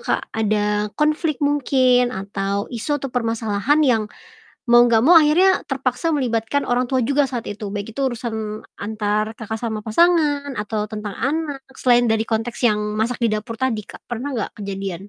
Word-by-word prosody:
Kak, - - +1
ada 210 -1 0
konflik 305 0 +1
mungkin 255 -3 +3
atau 200 -1 -3
isu 290 +6 -1
atau 270 - -4
permasalahan 230 +3 0
yang 235 -5 +3 0.7
mau 240 0 +7
gak 235 -2 +4
mau 325 +9 +6
akhirnya 330 +5 +5
terpaksa 270 +4 -1
melibatkan 245 -1 -1
orang 245 +1 +2
tua 260 +1 0
juga 280 +4 +2
saat 245 -3 -4
itu, 205 -1 -6
baik 205 +3 -6
itu 275 - 0
urusan 220 -4 -3 0.2
antar 215 0 -2
Kakak 220 0 -6
sama 220 -2 -2
pasangan 290 +3 +2
atau 210 0 -2
tentang 210 -2 -5
anak 285 0 -2 0.2
selain 245 -1 +4
dari 225 -1 0
konteks 225 +1 -2
yang 210 - +1 0.2
masak 235 +2 0
di 225 - +2
dapur 220 +2 -3
tadi 245 -3 -1
Kak, - - -12
pernah 245 +3 -5 0.2
gak 215 - -12
kejadian? 195 -1 -5
235 Hz, 165 wpm, -21 LUFS, 215-270 Hz, 0.7 s, mau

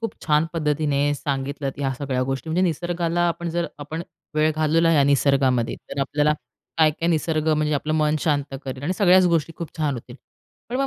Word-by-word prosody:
खूप 225 - -3
छान 150 0 +3
पद्धतीने 145 -3 +1
सांगितलत 140 0 -3
या 135 -2 0
सगळ्या 130 -3 -1
गोष्टी. 135 +4 -3
म्हणजे, 180 +3 +1
निसर्गाला 175 0 -1
आपण 170 0 -3
जर 170 +1 -1
आपण 155 +3 -5 0.3
वेळ 155 +1 +3
घालवला 160 +2 +3
या 145 - +5
निसर्गामध्ये 135 -3 +2 0.2
तर 140 - -3
आपल्याला 145 +2 +2 0.5
काय-काय 160 +1 +3
निसर्ग 160 -1 0
म्हणजे 155 0 0
आपलं 150 +2 -1
मन 155 -1 +2
शांत 145 -3 0
करेल 130 0 -6
आणि 170 +6 0
सगळ्याच 185 -2 +6
गोष्टी 165 -1 +1
खूप 170 - -7
छान 150 -3 0
होतील. 120 0 -9 0.5
पण 245 - -2
मग 275 +1 +1
150 Hz, 180 wpm, -23 LUFS, 140-165 Hz, 0.5 s, सगळ्याच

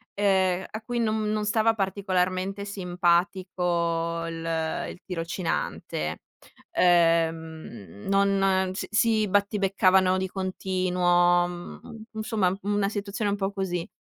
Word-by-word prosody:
ehm, 190 -2 +2
a 220 - -5
cui 245 +1 -3
non 215 -2 0
non 215 0 -1
stava 225 +1 +2
particolarmente 190 0 -1
simpatico 175 -3 0
il 165 -1 -3
il - - -10
tirocinante, 165 - -3 0.5
uhm, 160 - +1
non 195 -1 +2
s 190 - -4
si 215 0 +2
battibeccavano 190 -2 +3
di 190 0 -1
continuo 180 -2 +2
mhmm, 175 +5 -9
insomma 215 -4 0
una 205 0 +1
situazione 205 0 -3
un 205 - -1
po' 195 0 -1
così. 185 -3 -3
185 Hz, 105 wpm, -26 LUFS, 175-200 Hz, 0.5 s, battibeccavano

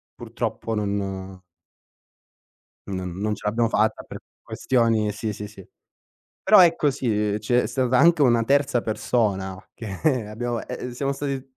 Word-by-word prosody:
purtroppo 115 - -4
non 95 -2 -3 1.5
non 95 -2 -4
non 105 +2 -1
ce 105 - -6
l'abbiamo 115 +2 +1
fatta, 110 -1 +1
per - - -9 0.2
questioni 115 -4 +1
sì, 105 +1 -4
sì, 105 +1 -7
sì. 100 -3 -14 0.7
Però, 210 +1 +6
ecco 165 -4 +5
sì, 105 -6 -1
c'è 120 +4 +1
stata 130 -1 +1
anche 165 -1 +5
una 120 -2 +4
terza 135 -1 +2
persona, 100 -4 -1
che 115 - -1
abbiamo 120 +2 -3
ehm, 125 0 -6
siamo 135 +3 -2
stati 135 -1 -5
115 Hz, 135 wpm, -23 LUFS, 105-130 Hz, 1.5 s, Però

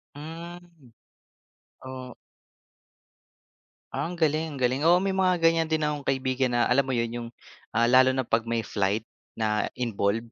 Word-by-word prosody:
Hmm, 165 -2 -10 0.9
o 130 -2 -8 1.8
Ang 175 +2 -3
galing, 155 -1 0
ang - - -7
galing. 130 +3 +1
Oo, 175 +2 +5
may 195 - +1
mga 190 -1 +2
ganyan 165 0 +4
din 160 -1 0
akong 150 -2 -2
kaibigan 130 -2 0
na 120 - +3
alam 130 +3 +2
mo 130 - 0
yun 115 -1 -1
yung, 120 0 -5 0.5
ah, 115 +1 +3
lalo 130 +1 +6
na 130 - 0
'pag 115 -1 0
may 115 -1 -1
flight 100 +1 -1 0.3
na 105 -1 0
involved 115 -1 -1
130 Hz, 150 wpm, -26 LUFS, 115-160 Hz, 1.8 s, lalo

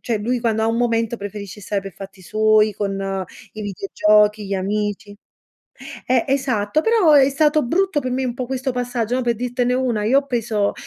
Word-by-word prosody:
cioè 230 -3 -2
lui 245 +4 -1
quando 225 -2 0
ha - - +2
un 225 - 0
momento 230 -1 0
preferisce 205 0 -8
stare 200 0 -2
per 195 -1 -9
fatti 195 0 -11
suoi 215 +2 +3
con 195 -1 -3 0.3
i 215 - -6
videogiochi, 210 +1 +2
gli 195 - -2
amici 205 +1 -3 0.9
eh, 250 -2 +2
esatto, 260 -3 0
però 430 -6 +3
è 275 -2 +6
stato 300 +2 +2
brutto 355 +4 +1
per 255 -2 -4
me 260 +1 -1
un 240 -2 -2
po' 250 -1 -4
questo 265 0 -2
passaggio, 245 -2 -2
no? 255 - 0
Per 235 -1 +1
dirtene 245 +1 -1
una, 245 -5 0
io 260 +5 +4
ho 280 - -15
preso, 225 -5 -1
230 Hz, 195 wpm, -20 LUFS, 205-255 Hz, 0.9 s, è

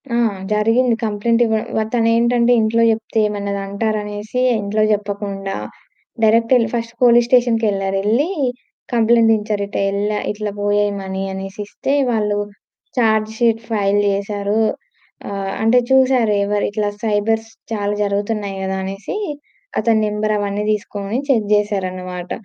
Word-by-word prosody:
ఆ! - - +2 0.4
జరిగింది. 225 +3 +2
కంప్లెయింట్ 225 +2 +1
ఇవ్వ 220 0 -1
తనేంటంటే 235 +1 +3
ఇంట్లో 225 +1 +2
చెప్తే 220 0 -2
ఏమన్నా 200 -1 -3
అంటారనేసి 210 +2 -2 0.2
ఇంట్లో 210 +2 0
చెప్పకుండా, 200 -1 -4 0.7
డైరెక్ట్ 230 +2 +3
ఏళ్ళి 230 -3 +1
ఫస్ట్ 230 0 -3
పోలీస్ 240 -1 +5
స్టేషన్‌కేళ్లారు, 220 -6 +2
ఏళ్లి 240 - +2 0.6
కంప్లెయింట్ 230 -1 +4
ఇంచ్చారు. 210 -1 -2
ఇటెల్లా 200 +1 -1
ఇట్లా 210 0 -4
పోయాయి 205 0 +1
మనీ 190 0 -4
అనేసి 195 +1 -7
ఇస్తే, 270 - -3 0.2
వాళ్ళు 210 -2 0 0.6
చార్జ్ 220 -2 +2
షీట్ 230 -1 +2
ఫైల్ 205 -2 +2
జేశారు, 200 +1 -1 0.7
ఆహ్, 195 -1 -3
అంటే 230 +3 +5
చూసారు 260 -4 +4
ఎవరు 205 0 0
ఇట్లా 205 0 -1
సైబర్స్ 220 +1 0 0.2
చాలా 205 -2 -1
జరుగుతున్నాయి 205 0 -2
కదా! 190 0 -2
అనేసి 195 - -5 0.6
అతని 225 -2 +2
నంబర్ 210 +1 -1
అవన్నీ 205 0 -2
తీసుకొని 205 +1 -3
చెక్ 225 -6 +2
చేసారన్నమాట. 185 -3 -3
210 Hz, 125 wpm, -19 LUFS, 200-225 Hz, 0.7 s, పోలీస్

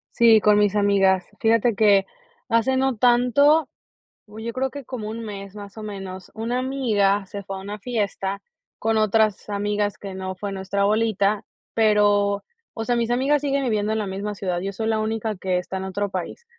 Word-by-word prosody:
Sí, 225 -2 +6
con 210 +1 +5
mis 205 -1 +2
amigas. 195 -2 +3
Fíjate 230 +1 +3
que, 200 -2 +4 0.4
hace 230 +3 +2
no 265 -2 +1
tanto, 250 +7 +4 0.6
uy 215 +1 -10
yo 235 - -3
creo 260 +3 -1
que 285 +1 -8
como 235 -4 -6
un 230 +1 -5
mes 200 -2 -8
más 205 0 -10
o 220 - -7
menos, 190 -3 -7
una 230 +3 -2
amiga 215 -7 +1
se 200 +1 -7
fue 195 0 -6
a - - -8
una 205 +2 -7
fiesta 200 -3 -2 0.4
con 225 0 0
otras 215 -1 +2
amigas 205 0 -1
que 195 -2 -8
no 190 0 -5
fue 200 +2 -5
nuestra 195 +1 -2
bolita, 210 -1 +1 0.3
pero, 205 -2 +3 0.3
o 225 - -4
sea, 240 +1 0
mis 235 -1 0
amigas 270 +4 +2
siguen 280 -1 0
viviendo 215 -3 0
en 220 - -1
la 210 - -2
misma 200 +2 -4
ciudad, 185 -3 -2
yo 195 +2 -4
soy 220 +3 -3
la 220 -1 +1
única 220 -1 -2
que 185 -1 0
está 185 +1 -5
en 190 - -4
otro 200 +2 -2
país. 190 - -5
210 Hz, 195 wpm, -23 LUFS, 200-230 Hz, 0.6 s, Sí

